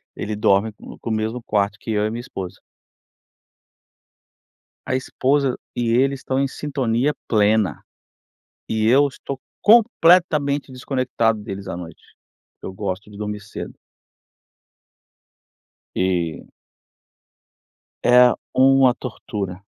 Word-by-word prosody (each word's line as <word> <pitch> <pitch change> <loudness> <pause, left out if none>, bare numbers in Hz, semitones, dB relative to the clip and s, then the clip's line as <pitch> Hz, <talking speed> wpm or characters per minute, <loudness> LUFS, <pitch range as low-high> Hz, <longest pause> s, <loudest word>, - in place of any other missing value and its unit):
ele 105 +1 -4
dorme 105 +1 +2
com - - -12
com - - -6
o - - 0
mesmo 110 +3 -2
quarto 105 -1 0
que 115 - -5
eu 105 -1 +1
e 110 - 0
minha 115 +2 -5
esposa. 95 -6 -7 2.3
A 130 - 0
esposa 135 +1 0 0.2
e 120 -1 0
ele 135 +2 +3
estão 130 0 -3
em 140 - +2
sintonia 135 -1 -1
plena. 105 -2 +2 0.9
E 110 0 0
eu 140 +4 +5
estou 135 0 -7 0.2
completamente 170 - +4
desconectado 125 -4 -1
deles 100 -2 -7
à - - -4
noite, 85 -2 -10 0.6
porque - - -9
eu - - -5
gosto 95 +1 -5
de 100 - -12
dormir 105 0 -4
cedo. 100 - -8 2.2
E 90 -3 -1 1.6
É 125 0 +6 0.2
uma 130 -1 +5
tortura. 100 -7 -6
115 Hz, 115 wpm, -21 LUFS, 105-135 Hz, 2.3 s, É